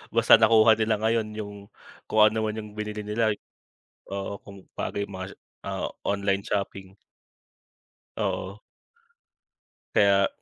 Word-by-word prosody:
Basta 115 Hz, 0 st, +7 dB
nakuha 110 Hz, 0 st, +6 dB
nila 110 Hz, -1 st, 0 dB
ngayon 110 Hz, 0 st, +1 dB
yung, 105 Hz, -1 st, -6 dB, 0.6 s
kung 110 Hz, -, +2 dB
ano 110 Hz, 0 st, -1 dB
man 110 Hz, 0 st, -2 dB
yung 105 Hz, -1 st, -9 dB
binili 105 Hz, 0 st, -5 dB
nila 110 Hz, +1 st, +1 dB
y 105 Hz, -, -5 dB, 0.7 s
oo, 100 Hz, +1 st, -4 dB
kung 100 Hz, -2 st, -13 dB
bago -, -, -3 dB
yung 100 Hz, -1 st, -4 dB
mga 95 Hz, +1 st, -6 dB
se -, -, -14 dB, 0.3 s
ah, -, -, -3 dB
o -, -, -12 dB
online 100 Hz, -1 st, 0 dB
shopping. 100 Hz, -1 st, -4 dB, 1.2 s
Oo. 100 Hz, +3 st, -3 dB, 1.3 s
Kaya 100 Hz, -1 st, +5 dB
105 Hz, 140 wpm, -26 LUFS, 100-110 Hz, 1.3 s, Basta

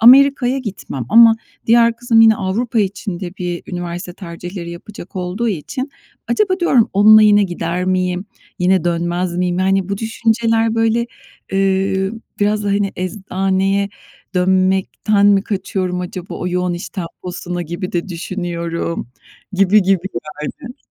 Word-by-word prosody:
Amerika'ya 265 Hz, +1 st, +6 dB
gitmem 200 Hz, -, -5 dB
ama 230 Hz, -, +7 dB, 0.3 s
diğer 230 Hz, 0 st, +4 dB
kızım 235 Hz, -1 st, +3 dB
yine 220 Hz, -1 st, +7 dB
Avrupa 220 Hz, +4 st, -1 dB
için 195 Hz, -2 st, -3 dB
de 180 Hz, -3 st, -5 dB
bir 175 Hz, -1 st, -3 dB
üniversite 175 Hz, +1 st, -5 dB
tercihleri 175 Hz, -1 st, -7 dB
yapacak 185 Hz, +1 st, -10 dB
olduğu 185 Hz, +6 st, -2 dB
için 240 Hz, -, -4 dB, 0.4 s
acaba 380 Hz, -3 st, +1 dB
diyorum, 260 Hz, -10 st, +3 dB
"Onunla 215 Hz, +2 st, +7 dB
yine 205 Hz, -1 st, +6 dB
gider 175 Hz, -1 st, -3 dB
miyim, 185 Hz, 0 st, 0 dB, 0.3 s
yine 180 Hz, -1 st, +2 dB
dönmez 175 Hz, +1 st, -1 dB
miyim?" 180 Hz, 0 st, 0 dB
Yani, 190 Hz, 0 st, +1 dB
bu 200 Hz, 0 st, -2 dB
düşünceler, 225 Hz, 0 st, +1 dB
böyle, 225 Hz, +1 st, +1 dB, 0.5 s
eee, 195 Hz, 0 st, +1 dB, 0.3 s
biraz 210 Hz, +1 st, +1 dB
da, 205 Hz, -, 0 dB
hani, 200 Hz, 0 st, 0 dB
"Eczaneye 195 Hz, +1 st, -1 dB, 0.5 s
dönmekten 190 Hz, +3 st, +2 dB
mi 200 Hz, -1 st, +5 dB
kaçıyorum 185 Hz, -3 st, -2 dB
acaba?" 180 Hz, 0 st, -6 dB
O 180 Hz, -, -3 dB
yoğun 180 Hz, 0 st, -1 dB
iş 175 Hz, -, -6 dB
temposuna 175 Hz, 0 st, -5 dB
gibi 175 Hz, +3 st, -5 dB
de 175 Hz, +2 st, -2 dB
düşünüyorum, 170 Hz, -, -4 dB, 0.4 s
gibi 195 Hz, +2 st, +4 dB
gibi 190 Hz, 0 st, +1 dB, 0.3 s
yani. 250 Hz, -, -7 dB
190 Hz, 135 wpm, -18 LUFS, 180-215 Hz, 0.5 s, ama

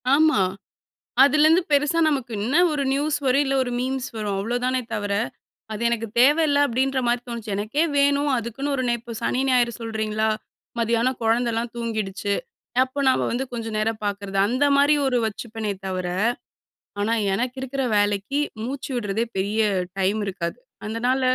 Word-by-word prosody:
ஆமா. 310 Hz, -8 st, +4 dB, 0.8 s
அதுலந்து 305 Hz, +4 st, +5 dB
பெருசா 295 Hz, +3 st, +2 dB
நமக்கு, 265 Hz, -6 st, -2 dB
என்ன 260 Hz, +8 st, +1 dB, 0.2 s
ஒரு 290 Hz, -2 st, -1 dB
நியூஸ் 295 Hz, +2 st, 0 dB
வரும், 265 Hz, +3 st, +4 dB
இல்ல 270 Hz, -, 0 dB
ஒரு 245 Hz, -, -4 dB
மீம்ஸ் 265 Hz, +1 st, -2 dB
வரும். 205 Hz, -3 st, -2 dB
அவ்ளோதானே 245 Hz, +4 st, 0 dB
தவர, 205 Hz, -1 st, -2 dB, 0.6 s
அது 215 Hz, +2 st, -4 dB
எனக்கு 230 Hz, -1 st, -1 dB
தேவயில்ல 290 Hz, +1 st, +4 dB
அப்டின்ற 265 Hz, +2 st, 0 dB
மாரி 240 Hz, 0 st, +1 dB
தோணுச்சு 230 Hz, -3 st, -5 dB
எனக்கே 220 Hz, +9 st, 0 dB
வேணு 280 Hz, 0 st, +3 dB, 0.2 s
அதுக்குன்னு 235 Hz, +5 st, -3 dB
ஒரு 260 Hz, -, -1 dB
நே 240 Hz, -, +2 dB
இப்போ 235 Hz, +1 st, -9 dB
சனி 255 Hz, -, 0 dB
ஞாயிறு 245 Hz, -2 st, +3 dB
சொல்கிறீங்களா 220 Hz, -1 st, -1 dB, 0.5 s
மதியான 235 Hz, +1 st, +2 dB
குழந்தலாம் 230 Hz, +1 st, +1 dB
தூங்கிடுச்சு 215 Hz, -4 st, -2 dB, 0.5 s
அப்போ 260 Hz, +2 st, -2 dB
நாம 260 Hz, -, +2 dB
வந்து 250 Hz, +3 st, -1 dB
கொஞ்ச 230 Hz, -1 st, -4 dB
நேரம் 220 Hz, +1 st, -1 dB
பாக்கறது 200 Hz, -1 st, -3 dB
அந்த 255 Hz, +6 st, +1 dB
மாரி 285 Hz, +2 st, +5 dB
ஒரு 250 Hz, -2 st, +2 dB
வச்சுப்பேனே 220 Hz, -1 st, -4 dB
தவர. 185 Hz, -1 st, -2 dB, 1.0 s
ஆனா 220 Hz, +3 st, +1 dB, 0.2 s
எனக்கு 250 Hz, +4 st, -2 dB
இருக்குற 265 Hz, +1 st, -2 dB
வேலைக்கு 205 Hz, +6 st, +1 dB, 0.2 s
மூச்சு 265 Hz, +3 st, -5 dB
விடுறதே 220 Hz, -1 st, -1 dB
பெரிய 205 Hz, +3 st, 0 dB, 0.4 s
டைம் 200 Hz, +3 st, +1 dB
இருக்காது 180 Hz, -3 st, -4 dB, 0.3 s
அதனால. 245 Hz, +5 st, 0 dB
235 Hz, 150 wpm, -23 LUFS, 215-270 Hz, 1.0 s, அதுலந்து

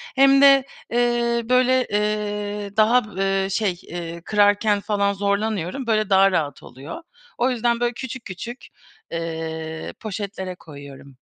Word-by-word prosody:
hem 275 Hz, 0 st, +6 dB
de, 275 Hz, -1 st, +7 dB, 0.3 s
eee, 240 Hz, 0 st, +1 dB
böyle, 255 Hz, 0 st, +3 dB
eee, 210 Hz, -1 st, -2 dB
daha 215 Hz, -1 st, +3 dB
b -, -, -1 dB, 0.2 s
eee, 190 Hz, -, -3 dB
şey, 195 Hz, -3 st, -1 dB
eee, 170 Hz, -1 st, -7 dB
kırarken 205 Hz, 0 st, +3 dB
falan 200 Hz, 0 st, 0 dB
zorlanıyorum, 200 Hz, +3 st, -2 dB
böyle 215 Hz, -2 st, +1 dB
daha 195 Hz, 0 st, +5 dB
rahat 145 Hz, -6 st, -2 dB
oluyor. 140 Hz, -, -9 dB, 0.3 s
O 245 Hz, +2 st, +2 dB
yüzden, 240 Hz, -1 st, 0 dB
böyle, 240 Hz, 0 st, 0 dB
küçük 260 Hz, 0 st, -7 dB
küçük, 235 Hz, +7 st, -8 dB, 0.4 s
eee, 160 Hz, -1 st, -5 dB
poşetlere 200 Hz, -3 st, -5 dB
koyuyorum. 140 Hz, -4 st, -13 dB
205 Hz, 135 wpm, -22 LUFS, 180-235 Hz, 0.4 s, de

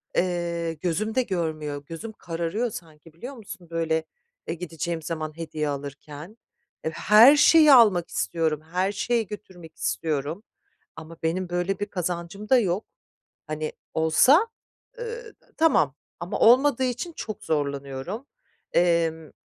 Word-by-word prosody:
Eee, 170 Hz, -2 st, -1 dB
gözüm 180 Hz, +7 st, -2 dB
de 260 Hz, -, +4 dB
görmüyor, 155 Hz, -7 st, -3 dB
gözüm 165 Hz, +9 st, -7 dB
kararıyor 175 Hz, +5 st, -3 dB
sanki, 160 Hz, -3 st, -11 dB
biliyor 245 Hz, -, -8 dB
musun, 195 Hz, -6 st, -11 dB
böyle, 160 Hz, -1 st, 0 dB, 0.4 s
eee, -, -, -1 dB
gideceğim 170 Hz, -1 st, -4 dB
zaman 155 Hz, -1 st, -5 dB
hediye 155 Hz, -2 st, -3 dB
alırken. 145 Hz, +6 st, -7 dB, 0.5 s
Eee, 160 Hz, -, 0 dB
her 220 Hz, -, +7 dB
şeyi 305 Hz, 0 st, +7 dB
almak 210 Hz, -9 st, +6 dB
istiyorum, 160 Hz, -3 st, -1 dB
her 185 Hz, +2 st, +1 dB
şeyi 230 Hz, +1 st, 0 dB
götürmek 180 Hz, -5 st, -11 dB
istiyorum. 145 Hz, -, -2 dB, 0.5 s
Ama 160 Hz, +1 st, -10 dB
benim 175 Hz, +3 st, -1 dB
böyle 180 Hz, +2 st, -1 dB
bir 205 Hz, -, -1 dB
kazancım 180 Hz, +1 st, -4 dB
da 260 Hz, -, +6 dB
yok. 195 Hz, -1 st, -1 dB, 0.6 s
Hani 155 Hz, 0 st, -3 dB, 0.2 s
olsa, 255 Hz, -, +5 dB, 0.5 s
eee, 470 Hz, -1 st, -7 dB, 0.2 s
tamam 230 Hz, -, +3 dB, 0.2 s
ama 175 Hz, -, -4 dB
olmadığı 260 Hz, +2 st, +5 dB
için 255 Hz, +7 st, -2 dB
çok 215 Hz, -7 st, -7 dB
zorlanıyorum. 140 Hz, -, -3 dB, 0.5 s
Emm, 165 Hz, -3 st, +1 dB
170 Hz, 125 wpm, -25 LUFS, 160-215 Hz, 0.6 s, her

